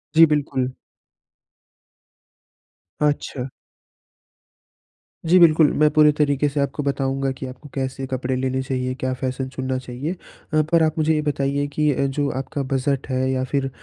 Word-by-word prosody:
जी, 165 - +9
बिल्कुल। 140 -4 0 2.3
अच्छा। 145 -3 -1 1.8
जी, 175 +3 +5
बिल्कुल 160 -3 +6
मैं 150 0 +5
पूरे 150 -1 +6
तरीके 145 -1 +2
से 145 +1 -3
आपको 140 +1 -1
बताऊँगा 135 -1 -1
कि 130 0 -7
आपको 130 +3 -11
कैसे 135 0 -3
कपड़े 130 0 -1
लेने 130 0 -1
चाहिए, 130 -1 -2
क्या 130 -1 -2
फैशन 130 +1 -3
चुनना 130 0 -3
चाहिए। 130 +7 -5 0.4
अ, 155 - +4
पर 165 -1 +5
आप 155 0 0
मुझे 160 0 +2
ये 150 - +1
बताइए 145 -1 -1
कि 150 -1 +2
अ, 140 - 0
जो 140 +1 -1
आपका 140 +1 -4
बजट 135 0 0
है 130 0 0
या 130 0 0
फिर 140 -1 0
135 Hz, 150 wpm, -22 LUFS, 130-150 Hz, 2.3 s, जी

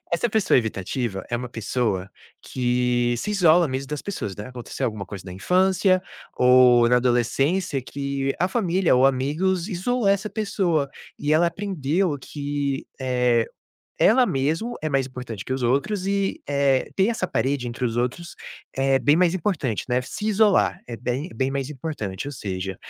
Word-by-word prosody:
essa 205 +8 +1
pessoa 215 -9 +3
evitativa 110 -2 -3
é 120 - 0
uma 125 +1 -5
pessoa 110 -4 -2 0.3
que 125 -1 0
se 210 - -3
isola 175 -4 +5
mesmo 130 +1 -4
das 150 0 -4
pessoas, 105 - -5
né, 105 +4 -7
aconteceu 125 -2 -6
alguma 105 -4 -4
coisa 95 -3 -8
na 90 - -7
infância 185 - +2 0.3
ou 125 -1 +6
na 125 - +5
adolescência 135 +6 +1
que 140 0 -3
a 180 +3 +2
família 185 - +2
ou 130 +2 +5
amigos 155 +8 0
isolou 225 +4 -1
essa 200 +2 +1
pessoa. 180 -9 0 0.3
E 145 +1 0
ela 165 +3 +4
aprendeu 175 -3 -1
que, 145 -1 -3
eh, 125 -3 +2 0.5
ela 245 +4 +5
mesmo 160 - -1
é 155 - 0
mais 135 -1 +1
importante 125 -6 -7
que - - -4
os 130 - -4
outros 180 - 0
e, 200 0 -1
eh, 140 -2 +2
ter 190 +1 +4
essa 225 -5 -1
parede 130 +1 -1
entre 120 +1 -8
os 115 -1 -1
outros 125 +8 -2 0.4
é 135 0 +3
bem 145 +3 +3
mais 175 -1 +3
importante, 160 - -1
né, 125 0 +2
se 210 +11 -5
isolar, 210 -1 +3
é 120 - -6
bem 130 +8 -3
bem 130 0 0
mais 135 +1 -3
importante, 130 - -5
ou - - -6
seja, 95 -5 -4
135 Hz, 170 wpm, -23 LUFS, 125-180 Hz, 0.5 s, ou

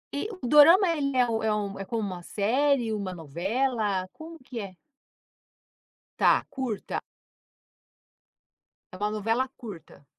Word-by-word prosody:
E 285 +10 -2
o - - -1
dorama, 330 - +7
ele 275 -3 -1
é - - +6
é - - +4
um 225 -1 -1
é 220 - +2
um, 200 -2 -4
é 195 - -5
como 230 +2 -2
uma 185 -3 -5
série, 235 +5 +1
uma 195 -3 -4
novela, 195 - -1
como 325 +1 -10
que 255 -2 -8
é? 200 -3 -6 1.5
Tá, - - +4
curta. 250 -6 -4 1.9
É - - -7
uma 205 +3 -1
novela 225 +5 0
curta? 190 - -11
225 Hz, 140 wpm, -27 LUFS, 200-265 Hz, 1.9 s, dorama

